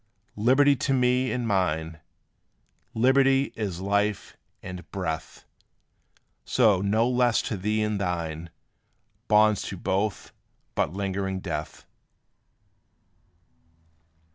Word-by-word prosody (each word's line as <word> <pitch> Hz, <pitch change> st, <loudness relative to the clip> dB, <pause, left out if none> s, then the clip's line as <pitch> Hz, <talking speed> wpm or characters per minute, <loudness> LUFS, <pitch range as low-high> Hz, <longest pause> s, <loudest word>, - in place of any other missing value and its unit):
Liberty 135 Hz, +5 st, +4 dB
to 135 Hz, -, 0 dB
me 125 Hz, 0 st, +2 dB
and 125 Hz, -2 st, -2 dB
mine 80 Hz, -5 st, -1 dB, 1.0 s
Liberty 135 Hz, +3 st, +3 dB
is 95 Hz, -5 st, -4 dB
life 100 Hz, 0 st, -1 dB, 0.3 s
and 90 Hz, -1 st, -8 dB
breath! 80 Hz, -5 st, -5 dB, 1.0 s
So 110 Hz, -7 st, +3 dB
no 110 Hz, +4 st, +2 dB
less 125 Hz, -2 st, +2 dB
to 110 Hz, -, -3 dB
thee 105 Hz, +3 st, -1 dB
and 105 Hz, -2 st, -1 dB
thine 85 Hz, -3 st, -3 dB, 0.8 s
Bonds 105 Hz, 0 st, +4 dB
to 95 Hz, -, -6 dB
both 100 Hz, +4 st, -2 dB, 0.4 s
but -, -, 0 dB
lingering 95 Hz, 0 st, -3 dB
death. 80 Hz, -5 st, -6 dB
100 Hz, 95 wpm, -26 LUFS, 90-120 Hz, 1.0 s, Liberty